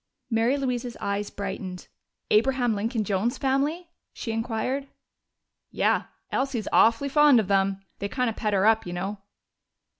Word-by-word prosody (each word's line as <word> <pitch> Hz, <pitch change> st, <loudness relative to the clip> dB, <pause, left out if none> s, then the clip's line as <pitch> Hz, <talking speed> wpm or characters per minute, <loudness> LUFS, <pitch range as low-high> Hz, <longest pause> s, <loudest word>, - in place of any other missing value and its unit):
Mary 230 Hz, +5 st, +2 dB
Louise's 250 Hz, -3 st, -3 dB
eyes 200 Hz, +1 st, -2 dB
brightened. 190 Hz, -2 st, -6 dB, 0.4 s
"Abraham 245 Hz, +1 st, +3 dB
Lincoln 220 Hz, +2 st, -1 dB
Jones's 205 Hz, +4 st, 0 dB
family?" 290 Hz, +6 st, -1 dB, 0.2 s
she 225 Hz, -, -5 dB
inquired. 235 Hz, +4 st, -2 dB, 0.8 s
"Yeah. -, -, +1 dB, 0.3 s
Elsie's 260 Hz, -5 st, -1 dB
awful 230 Hz, +5 st, +4 dB
fond 290 Hz, -2 st, +6 dB
of 210 Hz, -, -1 dB
them. 195 Hz, 0 st, +1 dB, 0.2 s
They 200 Hz, -, -3 dB
kind 250 Hz, +2 st, 0 dB
of 225 Hz, -, -2 dB
pet 210 Hz, -2 st, -1 dB
her 195 Hz, 0 st, +3 dB
up, 220 Hz, -3 st, +3 dB
you 175 Hz, -, -4 dB
know." 195 Hz, +3 st, -4 dB
225 Hz, 145 wpm, -26 LUFS, 200-260 Hz, 0.8 s, fond